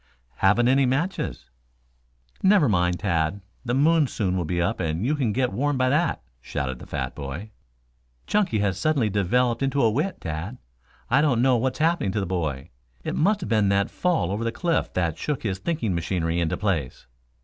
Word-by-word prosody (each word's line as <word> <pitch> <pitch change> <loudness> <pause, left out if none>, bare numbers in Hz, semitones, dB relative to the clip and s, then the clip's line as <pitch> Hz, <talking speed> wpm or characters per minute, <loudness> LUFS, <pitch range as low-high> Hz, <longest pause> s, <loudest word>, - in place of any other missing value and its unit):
"Haven't 105 +5 +3
any 135 +1 +4
matches." 145 - -2 0.9
"Never 190 -6 +5
mind, 90 -4 +2
Tad, 85 -2 0 0.2
the 120 -1 -1
moon 155 +2 +4
soon 95 -6 -1
will 90 -2 -1
be 85 +2 -1
up 85 - 0
and 85 +3 -1
you 145 - +2
can 135 -7 0
get 125 +2 0
warm 145 +1 0
by 130 0 +2
that," 150 - +1 0.2
shouted 65 -1 -4
the - - -11
fat - - -3
boy. 75 +9 -7 0.7
"Chunky 205 - +1
has 95 -2 0
suddenly 140 -9 +1
developed 120 +5 +1
into 135 +1 0
a 115 - +4
wit, 155 - -1
Tad. 85 +9 -5 0.5
I 140 - +5
don't 140 -6 +2
know 130 -1 +4
what's 130 +2 0
happened 160 - +1
to 105 - 0
the 95 - -1
boy. 80 -7 -3 0.3
It - - -3
must 200 +6 +2
have - - -5
been 105 -3 +3
that 100 0 +1
fall 175 - 0
over 105 +3 -2
the 115 - 0
cliff 170 +7 -1
that 85 -4 -1
shook 150 -3 -2
his 95 -4 -2
thinking 150 - -1
machinery 85 0 -1
into 85 -2 0
place." 85 - -2
110 Hz, 190 wpm, -24 LUFS, 90-140 Hz, 0.9 s, Never